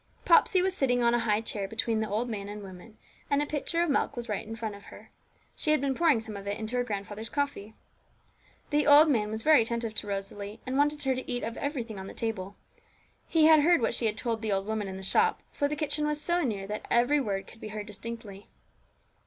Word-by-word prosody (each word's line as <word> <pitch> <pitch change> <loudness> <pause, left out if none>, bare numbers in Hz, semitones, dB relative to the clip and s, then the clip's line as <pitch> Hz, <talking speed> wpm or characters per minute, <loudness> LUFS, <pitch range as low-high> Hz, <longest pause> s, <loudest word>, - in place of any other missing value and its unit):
Popsey 365 +1 +5
was 380 0 0
sitting 245 -5 +1
on 235 0 +4
a 240 - +3
high 215 -2 +1
chair 205 -3 -3
between 225 +1 -1
the 220 - -2
old 220 +4 -1
man 205 -3 -5
and 205 0 -7
woman, 190 +3 -12 0.3
and 280 - +2
the 295 - +1
pitcher 310 +3 0
of 345 - -1
milk 280 - 0
was 240 -1 -5
just 210 -2 -3
in 225 - -6
front 225 -2 -4
of 200 0 -12
her; - - -14 0.4
she - - -3
had 305 -1 +4
been 275 0 0
pouring 310 -4 +3
some 220 -1 -7
of 200 0 -8
it 200 +1 -2
into 220 +2 -4
her 245 - +2
grandfather's 210 0 -5
coffee. 280 -7 -3 1.0
The 295 0 +2
old 300 +2 +8
man 210 -5 +1
was 220 +1 -4
very 310 -5 +6
attentive 230 -1 -2
to 215 - 0
Rosalie, 200 +1 -5
and 255 - -3
wanted 295 +1 +1
her 265 -1 +2
to 255 0 -5
eat 245 0 -2
of 230 - -4
everything 245 -8 -4
on 190 - -7
the - - -10
table. 205 -4 -4 0.7
He 320 -2 +4
had 315 -1 +8
heard 340 +3 +4
what 230 - 0
she 235 -1 0
had 215 0 -2
told 225 -2 -2
the 220 -2 -2
old 195 0 0
woman 215 -1 -2
in 190 0 -6
the 190 - -7
shop, 445 - +2
for 285 - 0
the 300 - -3
kitchen 300 0 -1
was 300 0 -1
so 345 +3 +1
near 210 - -2
that 210 +2 -6
every 245 +5 +3
word 195 -5 -2
could 225 - -16
be - - -6
heard 215 -1 -6
distinctly. 210 -1 -8
230 Hz, 245 wpm, -29 LUFS, 210-285 Hz, 1.0 s, old